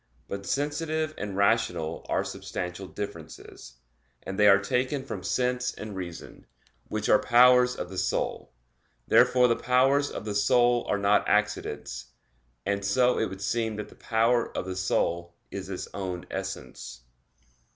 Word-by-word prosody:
But 100 0 -6
sensitive 155 +2 -1
and 100 -2 -5
rational 100 -6 +1
are - - +1
substantial 90 +1 -5
differences; 85 -10 -8 0.5
and 95 +2 -6
they 105 - +6
are 100 -1 +8
taken 125 +7 -1
from 100 -8 -5
sense 125 +5 0
and 105 -2 -7
reason, 90 -3 -8 0.4
which 110 0 -3
are 105 - +5
powers 125 +1 +5
of - - -6
the 95 - -3
soul. 95 +1 -2 0.6
Therefore 125 -1 +5
the 115 - +2
powers 135 +4 +2
of - - -7
the 105 - -3
soul 120 +4 +3
are - - +2
not 100 +1 +2
accidents; 105 0 -1 0.6
and 100 0 -1
so 125 +6 +2
it 110 - +1
would 95 +1 -8
seem 115 0 -1
that 105 0 -6
the - - -16
power 115 +1 +1
of - - -2
the 95 0 -4
soul 85 -2 -1 0.2
is 95 -1 -6
its 95 - -5
own 90 -3 -4
essence. - - -6
105 Hz, 150 wpm, -27 LUFS, 95-125 Hz, 0.6 s, are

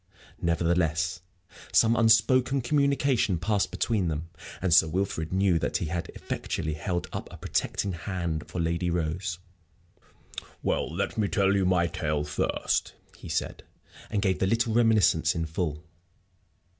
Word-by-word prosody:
Nevertheless, 85 0 +1 0.5
some 115 +1 +4
unspoken 120 +4 +4
communication 140 - +2
passed 100 +3 0
between 95 +1 0
them, 80 +1 -3 0.3
and 90 -3 +1
Sir 80 - +6
Wilfrid 80 -2 -2
knew 95 -2 +2
that - - 0
he - - -3
had 85 0 -3
effectually 80 -2 -3
held 85 +3 -2
up - - -5
a - - -10
protecting 100 - -1
hand 85 -3 -3
for 90 - -5
Lady 85 +1 0
Rose. 85 +1 -2 1.3
"Well, - - 0
let - - -2
me 105 - +2
tell 100 0 +2
you 95 -2 +2
my 90 -2 +3
tale 80 -4 -1
first," 75 0 -1 0.2
he - - -11
said; - - -2 0.5
and 105 -2 -1
gave 95 -2 +1
the 95 - +2
little 115 +2 +1
reminiscence 105 -9 +3
in 85 -1 -1
full. 80 -1 -3
90 Hz, 145 wpm, -27 LUFS, 85-105 Hz, 1.3 s, Sir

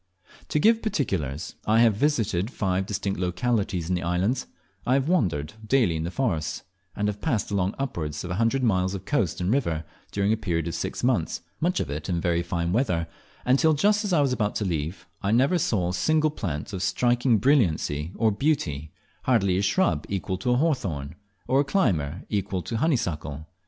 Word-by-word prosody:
To - - +1
give 225 +8 +4
particulars: 90 - -2
I 110 +2 +5
have 115 -2 +5
visited 110 - +1
five 95 -5 -1
distinct 100 -2 -2
localities 95 -1 0
in 90 - 0
the 90 - 0
islands, 95 +9 0 0.4
I 125 - +2
have 135 +1 +1
wandered 90 - +1
daily 110 -7 +2
in 80 0 -2
the - - -2
forests, 90 - -1 0.3
and 105 - 0
have 105 0 -3
passed 120 -10 -1
along 95 0 0
upwards 80 - -3
of 90 - -5
a 90 +6 -1
hundred 130 +4 +2
miles 95 -4 +2
of 95 0 -7
coast 110 - 0
and 90 +2 0
river 85 - 0 0.3
during 100 +1 +1
a - - 0
period 85 -6 -1
of 85 - -3
six - - -4
months, 120 -13 +1 0.2
much 180 +3 +1
of 70 - -3
it 75 +2 -4
very 85 -1 +1
fine 85 0 -2
weather, 90 -9 +1 0.4
and 130 +2 +4
till 160 -1 +4
just 210 +8 +3
as 205 - -2
I 165 -4 +4
was 135 -3 +2
about 105 -4 -1
to 105 - -1
leave, 80 0 -3 0.2
I 100 - 0
never 135 +10 +3
saw 95 - +1
a - - -2
single 155 - +2
plant 85 - -4
of 95 - -3
striking 120 +4 +2
brilliancy 90 - +2
or 110 -2 +2
beauty, 100 - -1 0.3
hardly 100 -8 +3
a - - +1
shrub 185 - +1
equal 95 -1 -2
to 125 - -1
a 125 - +4
hawthorn, 95 - -1 0.3
or 135 - +3
a - - +2
climber 95 - 0
equal 100 -3 -2
to - - -6
a - - +1
honeysuckle! 80 - -1
100 Hz, 200 wpm, -26 LUFS, 85-130 Hz, 0.4 s, I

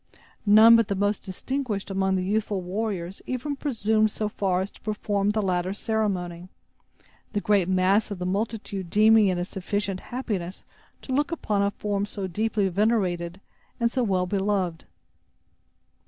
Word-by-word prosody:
None 220 +3 +9
but 230 -2 +4
the 200 - -1
most 205 +2 0
distinguished 210 +1 -4
among 190 0 +1
the 185 - 0
youthful 205 +1 0
warriors 190 -1 -3
even 255 +3 -2
presumed 220 -6 +1
so 210 0 -3
far 190 -3 0
as 190 - -4
to - - -20
perform 205 -1 -1
the 210 0 0
latter 185 0 0
ceremony, 185 -6 -2 0.8
the 205 - +1
great 200 -3 +2
mass 190 +3 +3
of 200 - -4
the 180 - -4
multitude 200 -1 -3
deeming 215 +2 +5
it 185 -2 +1
a 175 - -1
sufficient 195 0 -3
happiness 200 -8 -5 0.4
to 260 - -4
look 290 +4 +1
upon 210 -11 -1
a 200 - +2
form 205 0 -2
so 200 -2 -4
deeply 210 +2 0
venerated, 185 -3 0 0.4
and 235 -1 +2
so 260 - 0
well 190 -6 +1
beloved. 190 -3 -1
200 Hz, 155 wpm, -26 LUFS, 185-220 Hz, 0.8 s, None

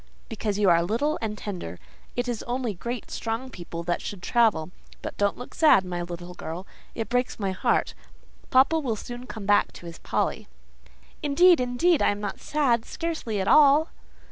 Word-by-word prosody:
"Because 205 -2 -2
you 205 -1 +3
are 170 -2 +5
little 235 - 0
and 215 -2 -3
tender. 175 - -6 0.4
It 245 +1 -1
is 240 -3 -2
only 245 -2 -1
great, 235 +6 -6
strong 230 +3 -3
people 170 -3 -7
that 175 0 -1
should 190 -4 -7
travel. 215 -9 +2 0.3
But - - -5
don't 205 0 +1
look 245 - -9
sad, 295 - +5
my 175 -1 -3
little 175 +1 -7
girl; 175 +2 -6 0.3
it 225 - -3
breaks 245 +1 -1
my 195 -2 -1
heart. 185 - +1 0.6
Papa, 275 +5 +4
will 250 -7 -1
soon 245 +3 -8
come 215 -3 -7
back 205 +1 +3
to - - -12
his 170 0 -9
Polly." - - -2 0.7
"Indeed, 340 +4 +5
indeed, 255 +7 +2
I - - +4
am 205 - -1
not 205 -1 -4
sad, 260 -7 +1
scarcely 315 -12 -3
at 190 - -1
all." 300 +4 +6
225 Hz, 180 wpm, -26 LUFS, 190-255 Hz, 0.7 s, all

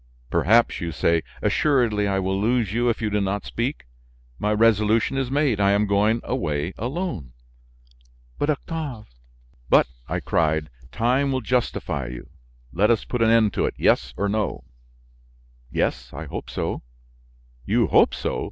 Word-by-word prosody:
"Perhaps, 115 +5 +3
you 85 -1 -3
say? 85 +1 +1 0.2
Assuredly 120 -8 +2
I 95 -1 0
will 95 +1 -1
lose 115 -2 +1
you 120 +1 +2
if 115 - -2
you 105 - 0
do 105 0 +1
not 100 +1 -2
speak; 125 - -3 0.5
my 105 - 0
resolution 110 +2 +3
is 135 -2 -1
made: 140 -6 +1
I 100 0 +4
am 105 +1 +2
going 105 +3 +2
away 75 +1 -2
alone." 120 - -4 1.1
"But, 145 - 0
Octave 145 - -4 0.3
" - - -32
"But," - - +6 0.2
I - - -1
cried, 80 -2 0 0.2
"time 130 +4 +1
will 130 -1 -1
justify 115 - -1
you! - - -9 0.4
Let 100 +5 +3
us 115 -2 +2
put 125 - -3
an 115 - +4
end 115 -3 +4
to - - +1
it; - - -4
yes 60 0 +2
or 100 - 0
no?" 105 +1 -2 1.1
"Yes, 60 -1 -1
I 80 +4 -6
hope 70 - -7
so." - - -3 0.9
"You - - +3
hope - - +4
so! - - -2
105 Hz, 160 wpm, -23 LUFS, 90-120 Hz, 1.1 s, But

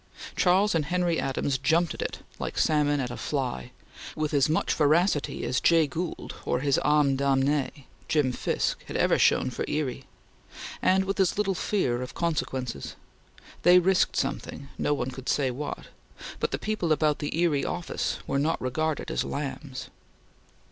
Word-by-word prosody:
Charles 195 +3 +3
and 160 -3 +1
Henry 175 +1 0
Adams 135 0 -1
jumped 165 +5 +2
at - - -7
it - - -4 0.2
like - - -4
salmon 145 -2 +2
at 125 -2 -2
a - - -6
fly, 130 - -3 0.5
with 155 0 -2
as 140 0 +3
much 160 - +1
voracity 155 +1 +2
as 125 - 0
Jay 165 -2 +5
Gould, 160 +5 -5
or 125 - 0
his 140 -1 +2
ame 150 -2 +3
damnee 140 +1 0 0.2
Jim 145 -5 +2
Fisk, - - -1
had - - -4
ever - - +3
shown - - +3
for - - -3
Erie; 145 -4 -2 0.8
and 190 +1 +3
with 195 +1 -2
as 190 -1 +2
little 200 -2 +1
fear 155 -11 0
of 125 - -7
consequences. 130 - -2 0.7
They 180 +1 +7
risked 185 +1 +3
something; 140 - -3
no 145 - +1
one 130 -2 -3
could 130 0 -7
say 135 -3 +1
what; 145 +4 -6 0.5
but - - 0
the - - -2
people 215 -6 -2
about 150 -1 +2
the 145 +1 -3
Erie 165 -5 +2
office 175 -1 -2
were 140 - 0
not 155 +3 +1
regarded 155 +4 -2
as - - 0
lambs. 140 -2 -5
150 Hz, 165 wpm, -27 LUFS, 135-170 Hz, 0.8 s, They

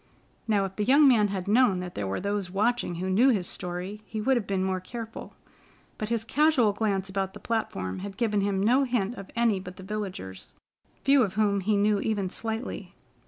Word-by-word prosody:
Now, 205 -3 +2
if 195 0 -8
the 210 - 0
young 280 +6 +6
man 225 -6 +5
had 195 -2 -4
known 215 -3 +4
that 180 -1 -6
there 100 -1 -3
were 95 - -2
those 200 -1 -2
watching 210 0 0
who 180 +3 -3
knew 215 +8 +4
his 205 -8 +1
story 180 +4 -5
he 220 - -5
would 265 +5 +2
have 235 -5 -1
been 195 -1 0
more 190 0 -1
careful, 225 +4 -8 0.6
but 215 - -3
his 230 -1 0
casual 270 -5 +3
glance 200 -2 -1
about 190 0 -2
the - - -8
platform 145 - -3
had 195 0 -7
given 210 -4 +1
him 195 -1 0
no 250 +6 +4
hint 240 -5 0
of 195 -5 -10
any 230 -4 +2
but 180 0 -10
the 190 - -10
villagers, 190 - -6 0.5
few 275 0 +5
of 200 -4 0
whom 205 -2 +2
he 205 +2 +1
knew 205 0 +2
even 200 -3 -1
slightly. 225 +1 -4
205 Hz, 210 wpm, -27 LUFS, 190-225 Hz, 0.6 s, young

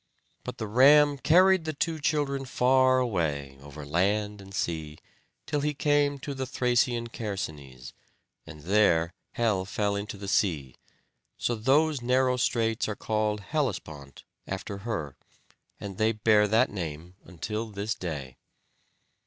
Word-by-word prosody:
But - - -7
the 110 - -4
ram 140 +6 +5
carried 185 +3 +4
the 155 - -2
two 160 +2 -2
children 145 -3 0
far 130 +1 +3
away 75 - -2
over 70 +1 -10
land 100 +6 0
and 95 0 -13
sea, 80 -5 -3 0.5
till 150 - -1
he 150 0 -1
came 145 0 +2
to 145 - -5
the 130 -1 -4
Thracian 120 -1 +1
Chersonese, 75 - -6 0.5
and 80 -2 -11
there 85 -3 +3 0.2
Helle 110 -5 +1
fell 100 +1 -1
into 100 0 -5
the 100 0 -8
sea. 75 - 0 0.6
So 120 - -1
those 135 +5 +2
narrow 125 +1 +2
straits 115 -2 0
are 105 - -3
called 105 -1 -1
"Hellespont," 90 - -4 0.2
after 100 +1 -5
her; 85 - -4 0.6
and 100 -2 -7
they 110 +1 +3
bear 105 -1 +3
that 110 +2 +3
name 85 -2 -6
until 105 +6 -4
this 105 +1 -3
day. 75 -8 -6
105 Hz, 135 wpm, -27 LUFS, 90-130 Hz, 0.6 s, ram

